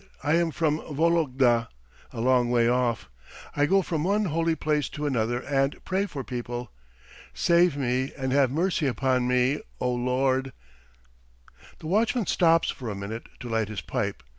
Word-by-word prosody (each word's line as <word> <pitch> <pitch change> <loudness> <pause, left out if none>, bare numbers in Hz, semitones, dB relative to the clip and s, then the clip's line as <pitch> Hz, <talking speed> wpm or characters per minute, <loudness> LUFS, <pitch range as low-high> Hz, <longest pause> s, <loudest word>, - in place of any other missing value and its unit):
I 150 - +1
am 170 0 +2
from 155 -1 0
Vologda, 140 -7 +1 0.4
a 115 - -5
long 125 -1 +3
way 120 -1 +3
off. 120 - 0 0.5
I 145 0 +2
go 195 +2 +3
from 160 -4 -2
one 205 +4 +1
holy 165 -1 0
place 150 -2 -1
to 150 - -5
another 120 -3 0
and 135 0 0
pray 195 +2 0
for 140 -7 -6
people. 120 -1 -5 0.6
Save 170 -3 +3
me 130 0 -1
and 130 -2 -2
have 135 -1 +3
mercy 165 +1 0
upon 130 0 +1
me, 125 +3 +2 0.2
O 125 - 0
Lord." 130 +2 0 1.2
The - - -13
watchman 215 +6 +1
stops 165 -1 +3
for 125 -4 -7
a 105 - -4
minute 100 +4 -6
to 125 - -6
light 115 -2 0
his 110 -3 -5
pipe. - - -3
135 Hz, 165 wpm, -26 LUFS, 125-160 Hz, 1.2 s, long